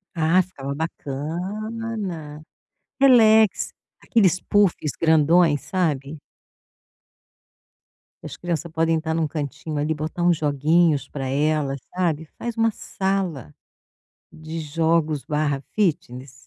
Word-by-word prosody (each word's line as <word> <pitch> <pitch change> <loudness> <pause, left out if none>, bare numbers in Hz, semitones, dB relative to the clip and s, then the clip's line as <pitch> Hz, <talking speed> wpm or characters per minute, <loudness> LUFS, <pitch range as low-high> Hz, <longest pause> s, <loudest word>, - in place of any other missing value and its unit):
Ah, 165 +3 +3
ficava 140 -7 -6
bacana. 170 +3 -5 0.6
Relax, 220 -5 +5 0.3
aqueles 185 -6 +2
puffs 195 -8 +1
grandões, 160 -1 +4
sabe? 155 -5 -2 2.0
E - - -12
as - - -7
criança 170 -1 -3
podem 165 0 +1
estar 160 0 -2
em - - 0
um 155 - +1
cantinho 150 0 -5
ali, 150 +2 0
botar 155 +3 -4
uns 175 -1 +4
joguinhos 150 +1 +2
para 135 -2 -5
elas, 145 0 0 0.2
sabe. 165 -4 0
Faz 235 -1 -4
uma 225 0 +3
sala 190 - -3 0.8
de 155 +1 -7
jogos/ 160 -1 0 0.5
fitness. 145 - -1
160 Hz, 105 wpm, -23 LUFS, 150-185 Hz, 2.0 s, Relax